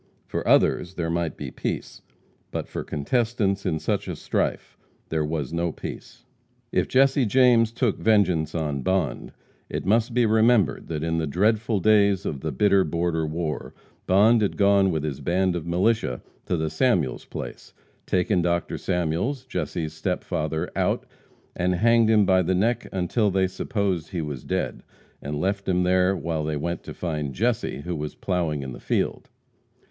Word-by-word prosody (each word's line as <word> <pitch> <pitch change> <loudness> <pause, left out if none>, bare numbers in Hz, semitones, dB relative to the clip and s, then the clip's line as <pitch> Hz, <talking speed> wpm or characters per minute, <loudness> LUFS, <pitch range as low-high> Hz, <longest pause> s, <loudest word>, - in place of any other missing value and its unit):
For - - -4
others 90 +2 +3
there 85 -2 -2
might 85 -2 -2
be - - -6
peace, - - -4 0.5
but - - -4
for - - -5
contestants 100 - 0
in 80 - 0
such 80 - -2
a - - -3
strife - - -2 0.3
there 80 -1 0
was 75 -2 -3
no 85 0 0
peace. - - -9 0.5
If - - +1
Jesse 135 +1 +4
James 120 -1 +4
took 115 -2 0
vengeance 90 -8 +2
on 75 -4 -2
Bond, 95 +1 -1 0.4
it - - -4
must 115 +4 +2
be 120 -1 +4
remembered 110 -6 +3
that 80 -2 -3
in 80 0 0
the 80 - -1
dreadful 105 +6 +1
days 100 -1 +3
of 70 -3 -3
the - - -2
bitter 100 +8 +3
border 85 0 -1
war, 80 -1 -4 0.3
Bond 110 +5 +5
had 100 - 0
gone 100 -1 +4
with 80 -4 -1
his 75 -4 -3
band 90 +1 +1
of 85 -1 -4
militia 90 - +1 0.2
to 90 - 0
the 80 -1 -2
Samuels' 85 - +1
place, - - -8 0.4
taken 90 0 +2
Dr. 85 0 -1
Samuels, 90 - -1
Jesse's 85 -10 -3
step 90 +3 -2
father, 80 +2 -2
out, - - 0 0.5
and 90 +1 +1
hanged 115 +3 +4
him 105 -2 +5
by 95 0 +4
the 95 +1 0
neck 115 +6 +1
until 95 +4 +1
they 95 0 +2
supposed 95 -3 -2
he 85 - -3
was 70 -4 -5
dead, - - -2 0.4
and 75 +1 -4
left 100 +2 -1
him 90 -1 +2
there 90 +1 +3
while 80 -2 -2
they 75 -1 -2
went 85 +4 -3
to - - -7
find 75 -6 -3
Jesse, 70 - -1
who 85 +3 -4
was 75 -1 -5
plowing 85 -6 -1
in 65 - -6
the - - -9
field. - - -2
90 Hz, 170 wpm, -25 LUFS, 80-105 Hz, 0.5 s, Bond